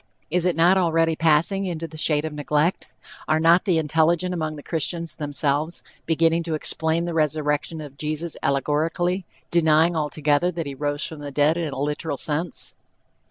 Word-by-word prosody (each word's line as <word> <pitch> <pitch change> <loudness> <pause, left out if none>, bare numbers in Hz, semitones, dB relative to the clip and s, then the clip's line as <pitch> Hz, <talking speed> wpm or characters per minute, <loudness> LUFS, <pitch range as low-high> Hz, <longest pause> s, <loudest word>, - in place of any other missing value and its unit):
Is 180 +1 +2
it 180 - +1
not 175 +3 +4
already 165 -2 +2
passing 165 +5 +2
into 165 -2 -4
the 160 - -13
shade 155 -1 +1
of 155 - -4
neglect? 150 +3 0 0.4
Are 155 +1 +2
not 170 +4 +4
the 180 -5 +2
intelligent 160 +3 +1
among 155 -3 -3
the 145 - -10
Christians 165 +1 -2
themselves 145 +2 -1 0.2
beginning 165 +1 +2
to 165 -2 -1
explain 160 +2 0
the 170 - -3
resurrection 155 0 0
of 140 -2 -11
Jesus 155 +2 -3
allegorically, 165 +6 0 0.2
denying 165 0 +4
altogether 150 +1 +1
that 165 -1 -3
he 140 - -5
rose 145 +1 -2
from 160 - -7
the 145 -1 -6
dead 145 +3 +2
in 165 -3 -2
a 135 - -5
literal 145 +1 -2
sense? 160 +5 -2
160 Hz, 170 wpm, -23 LUFS, 150-170 Hz, 0.4 s, not